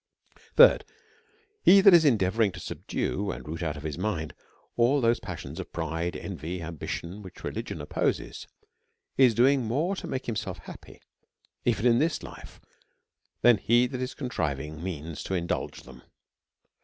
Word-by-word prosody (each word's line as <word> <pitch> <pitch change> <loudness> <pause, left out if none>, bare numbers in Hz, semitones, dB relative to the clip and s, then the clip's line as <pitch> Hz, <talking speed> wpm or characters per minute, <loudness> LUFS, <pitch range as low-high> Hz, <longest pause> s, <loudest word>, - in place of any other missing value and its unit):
Thirdh/, - - +8 0.8
He 200 - +7
that 195 -1 +7
is 170 -2 +7
endeavouring 110 -4 +3
to 85 - -8
subdue 100 +4 -3
and - - -6
root 80 +3 -5
out 80 -3 -2
of 75 - -9
his 80 +1 -4
mind 85 -7 -2 0.4
all 120 +5 +3
those 115 -2 +2
passions - - -7
of - - -7
pride, 85 +1 -3
envy, 85 -2 -5
and 85 -2 -6
ambition, 85 +4 -6
which 95 -3 -12
religion - - -5
opposes, - - -2 0.7
is 125 -4 +5
doing 130 +4 +4
more 150 - 0
to - - -6
make 130 - -4
himself 100 -5 -3
happy, 85 - -13 0.6
even 110 - +1
in 120 -1 +5
this 160 +3 0
life, - - -11 0.8
than 120 -2 +7
he 120 +2 +3
that 130 0 -4
is 130 +1 -4
contriving 80 - -3
means 80 -4 -5
to 95 - -3
indulge 85 -1 -3
them. - - -14
100 Hz, 155 wpm, -27 LUFS, 85-125 Hz, 0.8 s, Thirdh